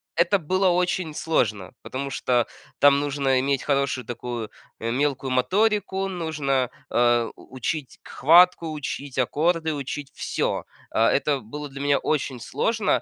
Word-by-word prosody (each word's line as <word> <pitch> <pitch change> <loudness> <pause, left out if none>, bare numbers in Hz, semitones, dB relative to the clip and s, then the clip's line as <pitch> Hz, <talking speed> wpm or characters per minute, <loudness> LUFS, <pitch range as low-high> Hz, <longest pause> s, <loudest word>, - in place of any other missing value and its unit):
это 170 +4 +3
было 185 +3 +2
очень 180 -2 0
сложно, 110 - -1
потому 140 +2 -5
что 125 -2 +1 0.3
там 140 0 +6
нужно 140 -2 +1
иметь 135 0 0
хорошую 140 -4 0
такую, 120 -2 -5 0.3
э, 115 +1 -2
мелкую 135 0 0
моторику, 195 - +1
нужно, 150 -8 -1 0.2
э, 120 -1 +3
учить 130 +2 -5
к - - -15
хватку, 170 +3 +5
учить 145 -3 -5
аккорды, 160 +5 +1
учить 140 0 -5
всё. - - -2 0.3
А, 115 +1 +3
это 145 0 +1
было 145 +7 -7
для 140 +1 -8
меня 145 0 +3
очень 135 -4 -1
сложно, 215 - 0
140 Hz, 140 wpm, -24 LUFS, 130-165 Hz, 0.3 s, там